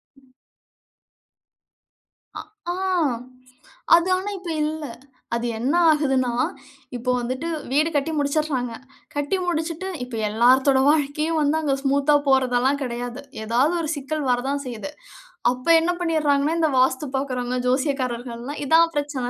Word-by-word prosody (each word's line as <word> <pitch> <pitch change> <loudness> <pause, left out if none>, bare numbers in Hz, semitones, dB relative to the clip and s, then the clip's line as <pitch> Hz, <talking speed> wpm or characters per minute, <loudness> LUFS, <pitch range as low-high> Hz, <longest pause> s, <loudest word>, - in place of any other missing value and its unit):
ம். 265 -2 -25 2.0
ஆ. - - -5 0.3
ஆ. - - -1 1.2
அது 345 +1 +2
ஆனா 385 +2 -4
இப்ப 355 -2 -8
இல்ல. 310 0 -3 0.5
அது 235 +1 -2
என்ன 265 +7 0 0.2
ஆகுதுன்னா, 270 -5 +1 0.7
இப்போ 250 +1 -1
வந்துட்டு 255 +6 -3 0.2
வீடு 305 +4 +3
கட்டி 290 +3 +1
முடிச்சுர்றாங்க. 280 -4 -1 0.4
கட்டி 290 +6 0
முடிச்சுட்டு 335 +2 -2 0.2
இப்ப 250 -2 -7
எல்லாத்தோட 260 +5 +4
வாழ்க்கையும் 305 +2 +1
வந்து 295 +2 +2
அங்க 285 -3 +1
ஸ்மூத்தா 280 +2 +3
போறதெல்லாம் 265 +1 +2
கெடையாது. 245 +1 -5 0.2
ஏதாவது 255 +9 +2
ஒரு 310 - -3
சிக்கல் 285 0 -3
வரதான் 275 +3 -1
செய்யுது. 250 +3 -6 0.6
அப்ப 255 +4 -7
என்ன 335 +2 +1
பண்ணிர்றாங்கன்னா, 310 -2 +1
இந்த 315 - +3
வாஸ்து 260 +3 +2
பாக்கிறவங்க, 255 -2 -2
ஜோசியக்காரர்கள் 255 -3 -1
எல்லாம், 280 +5 -6
இதான் 330 +3 +4
பிரச்சனை. 285 -4 -2
280 Hz, 125 wpm, -23 LUFS, 255-310 Hz, 2.0 s, எல்லாத்தோட